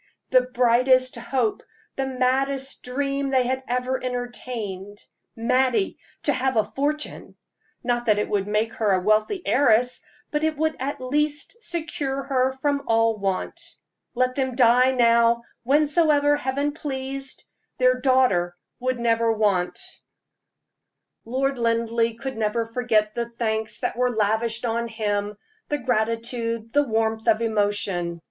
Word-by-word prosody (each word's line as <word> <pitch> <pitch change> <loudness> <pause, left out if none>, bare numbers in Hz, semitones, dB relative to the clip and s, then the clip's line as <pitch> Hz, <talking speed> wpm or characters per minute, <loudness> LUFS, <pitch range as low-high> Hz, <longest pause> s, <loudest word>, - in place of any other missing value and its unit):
the 255 -1 +6
brightest 255 +1 +3
hope, 235 -1 -1 0.3
the 270 0 -2
maddest 265 +1 0
dream 275 +2 -2
they 260 -2 +2
had 260 +1 -1
ever 250 +1 -1
entertained. 240 -5 -5 0.4
Mattie 255 - +1 0.3
to 290 - +2
have 255 -1 0
a 215 - +5
fortune! 295 +5 -3 0.5
Not 240 -1 -1
that 210 -1 +4
it 210 - 0
would 200 -1 -1
make 215 +2 0
her 210 -3 +1
a 185 - +3
wealthy 215 - +1
heiress, 250 -2 +3 0.3
but 300 0 -1
it 315 -1 0
would 315 +1 0
at 275 +2 -3
least 295 - -1
secure 295 -7 -3
her 265 -1 +1
from 280 +2 -1
all 225 -1 +2
want. 195 - -2 0.5
Let 255 +1 +1
them 260 -2 -2
die 250 +1 +5
now, 235 -2 +3 0.2
whensoever 290 +1 +3
Heaven 285 +1 -1
pleased 270 -2 -5 0.3
their 255 0 +3
daughter 245 -10 +2 0.2
would 255 0 -1
never 230 -1 +2
want. 200 -5 +1 1.5
Lord 265 +2 -1
Linleigh 230 0 +1
could 265 +1 -6
never 220 +1 0
forget 225 -3 0
the 235 0 -3
thanks 220 -2 -2
that - - -1
were 250 +1 +1
lavished 225 +1 0
on 235 0 -1
him 210 -2 -2 0.3
the 295 - 0
gratitude, 230 -1 -1
the 290 - +5
warmth 225 -3 -1
of 220 -1 +4
emotion. 205 -5 0
245 Hz, 135 wpm, -24 LUFS, 225-265 Hz, 1.5 s, the